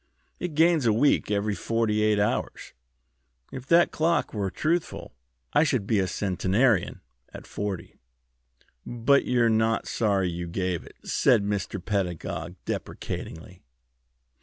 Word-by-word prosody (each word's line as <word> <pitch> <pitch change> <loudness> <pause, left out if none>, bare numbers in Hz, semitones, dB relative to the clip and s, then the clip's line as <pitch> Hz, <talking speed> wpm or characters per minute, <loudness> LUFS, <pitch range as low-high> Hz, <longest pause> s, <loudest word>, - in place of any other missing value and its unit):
It 175 -4 -4
gains 160 -4 +4
a 110 - +4
week 130 +2 +2
every 105 0 0
forty 110 0 0
eight 105 -1 +3
hours. 105 +1 -2 0.8
If 130 0 -8
that 170 +3 +5
clock 165 +2 0
were 100 -3 -2
truthful, 165 - -2 0.4
I 145 - +5
should 130 -9 0
be 110 -1 +1
a 95 - +1
centenarian 95 +3 +1 0.3
at - - -10
forty." 100 -4 -5 0.8
"But 120 +4 +2
you're 120 -2 +2
not 110 0 +1
sorry 100 -4 +1
you 85 +1 -5
gave 90 -1 -2
it?" - - -15
said 100 - +3
Mr. 100 -1 -2
Pedagog, 90 -4 -3
deprecatingly. 85 +3 -6
105 Hz, 130 wpm, -26 LUFS, 95-125 Hz, 0.8 s, that